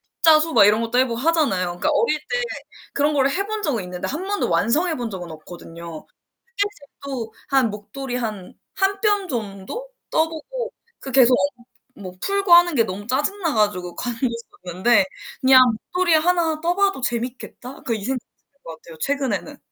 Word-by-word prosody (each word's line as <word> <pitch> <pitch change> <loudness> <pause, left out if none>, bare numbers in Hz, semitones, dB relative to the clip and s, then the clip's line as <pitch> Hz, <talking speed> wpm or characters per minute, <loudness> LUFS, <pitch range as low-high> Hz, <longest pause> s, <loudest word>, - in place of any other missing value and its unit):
십자수 320 0 +4
막 200 - +7
이런 215 +2 +4
것도 230 +2 -1
해 260 - +5
보고 235 -2 -3
하잖아요. 290 - +2
그니까 175 0 -1
어릴 465 -11 +2
때 - - -2 0.5
그런 290 +2 +2
거를 275 -1 +3
해 395 +6 -1
본 430 0 -4
적은 250 - -1
있는데 180 0 -5
1 315 +8 -4
번도 405 +1 -1
완성해 320 +7 +2
본 240 -2 -4
적은 180 -4 -7
없거든요. 165 0 -10 0.5
뜨개질도 280 - -4 0.2
한 265 -5 +3
목도리 245 +5 -6
한 215 -6 -5 0.2
1 390 0 +1
뼘 410 -3 +1
정도 220 - -5 0.2
떠보고 330 +11 -2 0.3
그 270 - -7
계속 255 -1 +6 0.6
엉키고 185 -2 -9
풀고 395 -2 +1
하는 345 -1 +7
게 230 -4 +4
너무 205 0 -6
짜증나 300 - -1
가지고 195 -5 0
관뒀었는데 235 - 0 0.4
그냥 260 -1 +7 0.3
'목도리 360 -2 +3
하나 325 -1 +2
떠봐도 360 +1 +1
재밌겠다.' 245 +1 -5
그 235 - 0
이 210 -3 -5
생각이 255 0 -2 0.2
드는 280 - -42
것 165 - -8
같아요, 165 -1 -13
최근에는. 275 - -2
265 Hz, 340 characters per minute, -22 LUFS, 215-335 Hz, 0.6 s, 막